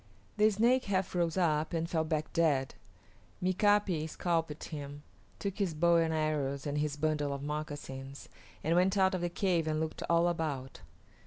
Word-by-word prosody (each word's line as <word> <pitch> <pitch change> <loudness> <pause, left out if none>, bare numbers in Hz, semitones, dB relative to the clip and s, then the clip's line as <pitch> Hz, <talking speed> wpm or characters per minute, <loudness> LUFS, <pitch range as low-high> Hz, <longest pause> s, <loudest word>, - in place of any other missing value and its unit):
The 215 +1 +5
Snake 235 +5 +2
half 190 -2 -1
rose 170 -1 0
up 155 -3 +1
and 165 0 -1
fell 165 -2 0
back 155 -1 -2
dead. 145 -5 +2 0.7
Mika´pi 185 -3 +2
scalped 165 -3 -1
him, 145 -1 -7 0.3
took 200 0 -4
his 185 -6 0
bow 170 +2 +4
and 165 -1 +2
arrows 150 -3 -1
and 145 0 -1
his 150 -1 -1
bundle 150 -1 0
of 140 0 -4
moccasins, 145 -2 -6 0.4
and 165 +3 +2
went 185 +3 +3
out 190 -1 +4
of 185 - -1
the 175 - 0
cave 175 -2 0
and 155 0 0
looked 160 0 -3
all 170 +1 +4
about. 150 -6 -3
160 Hz, 170 wpm, -32 LUFS, 150-180 Hz, 0.7 s, The